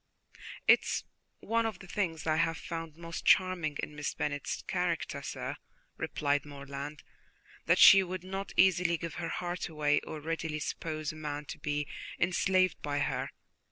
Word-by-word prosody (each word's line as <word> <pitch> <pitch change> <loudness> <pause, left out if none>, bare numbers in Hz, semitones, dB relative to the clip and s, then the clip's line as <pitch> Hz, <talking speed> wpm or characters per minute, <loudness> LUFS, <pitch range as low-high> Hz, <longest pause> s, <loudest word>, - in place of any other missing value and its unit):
"It - - +9
is - - -2 0.4
one 230 0 +1
of 215 -4 -4
the 190 - -12
things 170 -4 -2
I 155 -1 +2
have 165 0 +2
found 165 -2 -6
most 170 0 -6
charming 180 -6 +3
in 150 - -5
Miss 145 -1 -3
Bennet's 145 -1 -2
character, - - -1
sir," - - -4 0.4
replied 145 -1 0
Morland, 140 0 -7 0.6
"that - - +5
she 195 - +10
would 185 -1 -4
not 190 +1 -5
easily 180 -2 +4
give 170 -1 -5
her 165 - -2
heart 175 0 -3
away, 150 -2 +2
or 155 - -7
readily 160 0 -3
suppose 155 0 -3
a - - -11
man 150 -1 -4
to - - -8
be 150 0 -2 0.3
enslaved 185 +1 +2
by 145 -1 -2
her. 145 - -1
165 Hz, 160 wpm, -31 LUFS, 150-180 Hz, 0.6 s, she